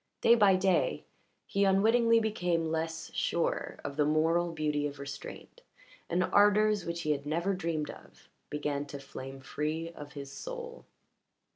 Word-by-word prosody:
Day 230 - +7
by 205 -5 +6
day 185 -1 +1 0.4
he 200 - 0
unwittingly 225 +4 +4
became 180 -7 0
less 160 0 -3
sure 170 - -1
of 140 0 -5
the 150 - +4
moral 165 +3 +2
beauty 150 -2 0
of 145 0 -8
restraint, 140 0 -9 0.5
and 180 +2 +2
ardours 205 0 +4
which 170 0 -3
he 155 - +1
had 145 -1 -2
never 170 +6 0
dreamed 165 -5 -2
of - - -16 0.2
began 145 -1 -2
to 140 - -7
flame 135 0 -8
free 155 +5 -3
of 145 -3 -10
his 140 -1 -7
soul. - - -7
165 Hz, 150 wpm, -31 LUFS, 150-195 Hz, 0.5 s, Day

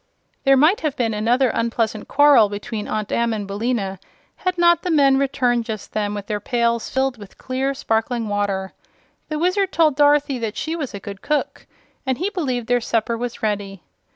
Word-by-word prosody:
There 270 0 +6
might 310 +9 +4
have 305 -4 -1
been 230 -3 0
another 240 +5 +2
unpleasant 230 -2 -1
quarrel 280 -7 +5
between 210 +1 -5
Aunt 215 -1 -3
Em 235 -1 +1
and 210 -2 -3
Billina 200 -1 -2 0.4
had 365 -1 -2
not 345 -1 +4
the 360 - -3
men 275 -4 +4
returned 250 -4 +1
just 215 -3 -6
then 210 -1 -1
with 205 -1 -5
their 210 0 -2
pails 235 +1 0
filled 265 -2 -1
with 205 -2 -13
clear, 265 +2 -2
sparkling 225 -1 -1
water. 200 -2 -2 0.6
The 305 - -2
Wizard 365 +4 +1
told 310 -4 +3
Dorothy 290 -2 +3
that 225 -2 -4
she 320 +1 -2
was 285 -10 -5
a - - -5
good 200 0 -9
cook 300 -1 -2 0.4
and 260 -2 -1
he 375 +5 -2
believed 260 - -2
their 245 +1 +1
supper 230 0 0
was 240 0 -5
ready. 200 -4 -2
240 Hz, 185 wpm, -21 LUFS, 215-280 Hz, 0.6 s, There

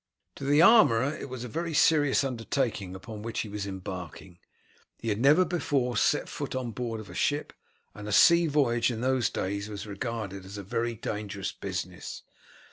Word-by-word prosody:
To - - -8
the 145 +3 +5
armourer 145 - +6
it - - -7
was 125 -1 -6
a - - -5
very 165 +6 -3
serious 145 -3 +4
undertaking 115 -6 -2
upon 105 +3 -8
which 115 +1 -3
he 110 - -6
was 100 -1 -4
embarking. 90 -2 -7 0.6
He 115 - -4
had 105 0 0
never 150 +8 +5
before 140 -8 0
set - - +2
foot - - -5
on 125 -2 -3
board 115 -1 -4
of 110 - -9
a - - -11
ship, 145 +1 -1 0.4
and 105 0 -9
a - - -3
sea 170 - +6
voyage 125 -6 +2
in 115 -2 -4
those 130 -1 +1
days 100 +2 -3
was 105 -1 -6
regarded 105 -2 -5
as 95 +2 -9
a 100 - -6
very 115 +5 -2
dangerous 105 -2 -4
business. 90 -2 -6
115 Hz, 185 wpm, -28 LUFS, 100-135 Hz, 0.6 s, armourer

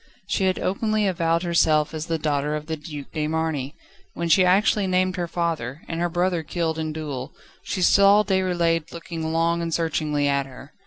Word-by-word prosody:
She 195 -1 0
had 185 -1 +1
openly 215 +2 0
avowed 170 -2 +1
herself 160 -3 +2
as 155 0 -4
the 165 -1 0
daughter 150 -1 -1
of 150 0 -5
the 160 0 -3
Duc 150 -2 -9
de 150 -1 -1
Marny. 155 -3 -2 0.4
When 170 0 -2
she 185 +3 +6
actually 195 +2 +3
named 185 0 +1
her 175 -2 -2
father, 160 -5 -3
and 165 - -4
her 175 0 0
brother 175 0 0
killed 160 0 -2
in 155 -1 -2
duel, 145 -4 -5 0.3
she 185 - -3
saw 200 +3 +6
Déroulède 175 -4 0
looking 165 -1 -5
long 165 +1 +1
and 165 0 -3
searchingly 155 -3 0
at 140 -1 +1
her. 135 +2 -13
165 Hz, 190 wpm, -24 LUFS, 150-180 Hz, 0.4 s, she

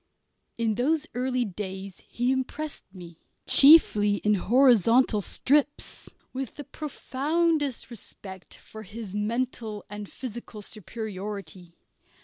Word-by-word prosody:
In 230 -2 +1
those 295 +7 +1
early 250 0 0
days 190 -1 -7
he 245 +2 0
impressed 280 +3 -3
me, 175 -3 -12 0.3
chiefly 215 -9 +7
in 210 +1 +1
horizontal 235 +1 +4
strips, 290 +8 0 0.2
with 260 -2 -5
the 290 - -7
profoundest 295 -1 -2
respect 190 -4 -10
for 220 - -12
his 210 -1 -8
mental 220 -1 -3
and 205 -1 -7
physical 235 -4 -8
superiority. 195 -4 -7
230 Hz, 105 wpm, -26 LUFS, 205-260 Hz, 0.3 s, chiefly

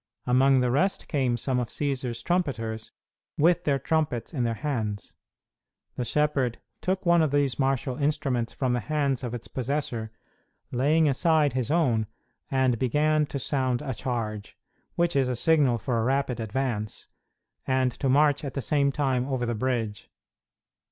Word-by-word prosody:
Among 130 +1 +4
the 125 -1 +1
rest 190 +10 +1
came 130 -5 0
some 125 +2 -1
of 120 - -1
Cćsar's 130 -4 -3
trumpeters, 115 -11 -2 0.5
with 165 +3 +3
their 140 -2 +2
trumpets 145 -2 -1
in 130 -5 -1
their 115 -1 -1
hands. 110 -7 -3 0.8
The 125 - -2
shepherd 135 -3 +1 0.2
took 185 +1 -1
one 170 -1 +5
of 155 - +2
these 140 -2 +1
martial 135 0 0
instruments 140 -5 0
from 130 -2 -1
the 125 - +1
hands 140 -1 -1
of 120 -1 -3
its 120 - -8
possessor, 125 -4 -3 0.6
laying 150 +6 +3
aside 150 0 +2
his 125 -3 -1
own, 130 -10 +2 0.4
and 130 -3 +2
began 150 +4 +2
to 140 - -4
sound 130 -1 -1
a 135 -3 -3
charge 110 -4 -4 0.4
which 170 0 +1
is 135 -2 +3
a 125 - -1
signal 140 -2 +3
for 115 +1 -1
a - - 0
rapid 130 0 0
advance 110 -2 -3 0.6
and 130 -1 +2
to 135 - -2
march 145 +2 +3
at 140 - -5
the - - -1
same 140 -2 +2
time 130 -3 0
over 130 -3 -1
the 120 - -1
bridge. 115 -3 -2
130 Hz, 160 wpm, -26 LUFS, 120-145 Hz, 0.8 s, one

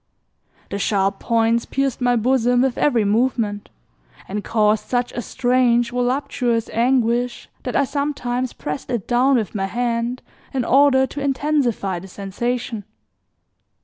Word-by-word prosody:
The 200 - -3
sharp 195 -1 +1
points 230 0 +1
pierced 270 -1 -1
my 245 0 +3
bosom 245 +1 +2
with 265 -2 0
every 240 -7 +2
movement 215 -1 0 0.6
and 205 +1 -4
caused 215 -1 +1
such 245 -1 0
a 240 - -4
strange 245 -1 +2
voluptuous 245 -2 -1
anguish 240 0 +1
that 250 - -4
I 280 - +4
sometimes 260 -3 -2
pressed 150 -1 -6
it 235 -5 -2
down 255 +3 +3
with 220 -6 -1
my 195 -3 -1
hand 235 +2 -2 0.3
in 255 -3 0
order 270 0 +5
to 280 +2 -7
intensify 270 - 0
the 190 - -11
sensation. 225 +4 -3
240 Hz, 135 wpm, -21 LUFS, 220-255 Hz, 0.6 s, order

